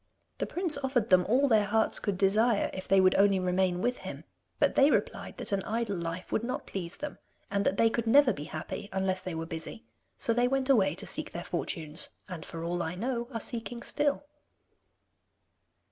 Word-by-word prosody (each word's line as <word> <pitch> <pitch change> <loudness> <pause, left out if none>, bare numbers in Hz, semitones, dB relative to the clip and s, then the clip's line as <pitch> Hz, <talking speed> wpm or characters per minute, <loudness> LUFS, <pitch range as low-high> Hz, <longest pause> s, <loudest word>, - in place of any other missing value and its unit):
The - - -1
prince 345 -5 -1
offered 260 -6 0
them 180 -1 +5
all 265 +5 +4
their 220 -5 +4
hearts 220 +2 +1
could 200 -3 -2
desire 210 +3 +3
if 190 - -6
they 195 - +5
would 185 0 +5
only 200 -1 +4
remain 180 0 +1
with 245 0 0
him, - - -7 0.3
but - - +3
they 275 +1 +5
replied - - -1
that - - -3
an 200 -1 +1
idle 225 -1 -2
life 170 +1 -5
would 220 - 0
not 250 +2 -3
please 180 -2 -5
them, 295 0 -6 0.3
and 200 0 +1
that 195 - +1
they 230 - +5
could 230 0 -1
never 275 +2 +6
be 145 - -7
happy 160 +6 -6
unless 190 -1 0
they 180 -3 -5
were 165 0 -3
busy, 165 +7 -7 0.3
so 230 - +1
they 245 +1 +3
went 270 +1 +1
away 210 -7 +3
to - - -5
seek - - -3
their - - -4
fortunes, 155 -4 -1 0.2
and 180 -5 -7
for 165 0 -7
all 175 +1 -1
I 165 +1 -3
know 235 +4 -2
are 230 - -3
seeking 235 +1 -5
still. 290 0 0
205 Hz, 205 wpm, -30 LUFS, 185-240 Hz, 0.3 s, never